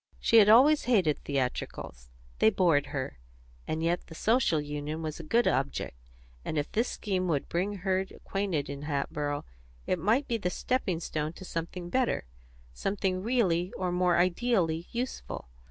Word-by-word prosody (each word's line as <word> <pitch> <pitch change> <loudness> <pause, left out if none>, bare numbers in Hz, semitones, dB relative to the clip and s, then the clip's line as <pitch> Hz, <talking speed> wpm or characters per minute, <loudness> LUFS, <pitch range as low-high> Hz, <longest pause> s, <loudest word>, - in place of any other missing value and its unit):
She 230 - +4
had 210 -2 +8
always 275 +7 +6
hated 190 - +3
theatricals; 125 - -3 0.3
they 110 - +6
bored 145 -2 +3
her; 130 - -4 0.5
and 160 +1 -2
yet 170 +1 0
the 160 - -11
Social 220 -6 +2
Union 150 +2 -4
was 155 0 -4
a - - -6
good 235 +9 +2
object, 135 - -1 0.5
and 155 - -3
if 145 +1 -1
this 230 +3 +1
scheme 185 -3 -2
would 150 -5 0
bring 185 +4 -1
her 190 -1 +2
acquainted 190 -4 -3
in 140 0 -6
Hatboro' 145 0 -2 0.4
it 185 - 0
might 230 - +2
be 235 - 0
the 180 -5 -1
stepping 190 -3 -1
stone 155 -1 -3
to 190 - -10
something 175 +1 -5
better, 255 - +1 0.5
something 190 - -1
really 190 -6 +1
or 180 -1 -1
more 180 0 +2
ideally 175 -2 +1
useful. 240 - -5
175 Hz, 160 wpm, -29 LUFS, 150-205 Hz, 0.5 s, had